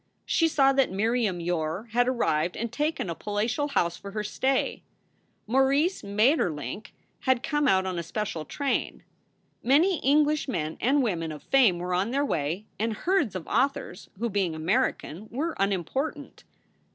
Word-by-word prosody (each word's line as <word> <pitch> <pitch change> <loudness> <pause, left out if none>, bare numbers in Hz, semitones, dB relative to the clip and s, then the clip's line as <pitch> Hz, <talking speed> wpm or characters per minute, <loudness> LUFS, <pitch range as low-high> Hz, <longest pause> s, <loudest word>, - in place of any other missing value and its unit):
She 330 - +3
saw 275 -3 +4
that 270 -1 +3
Miriam 215 -1 0
Yore 170 +4 -2
had 245 +2 +2
arrived 175 -9 0
and 230 0 -3
taken 300 -5 -1
a 170 - -2
palatial 210 - -1
house 175 -12 0
for 200 - -9
her 210 -1 -2
stay. 260 +5 0 0.6
Maurice 275 - +2
Maeterlinck 205 - 0 0.3
had 260 -2 +1
come 295 0 +1
out 190 -6 +3
on 185 -2 -2
a - - -1
special 170 -1 -4
train. 280 - -2 0.6
Many 315 +7 +3
English 300 +2 +2
men 160 - -2
and 275 +4 +3
women 165 -8 -1
of 150 - -9
fame 245 -10 +4
were 180 +1 -3
on 185 +5 +1
their 280 +3 +1
way, 165 - -2
and 225 +1 0
herds 325 - 0
of 175 -4 -5
authors 275 -8 -1
who, 235 +4 -1
being 195 -6 -1
American, 190 - -1
were 315 +7 -2
unimportant. 200 - -2
225 Hz, 155 wpm, -27 LUFS, 180-275 Hz, 0.6 s, saw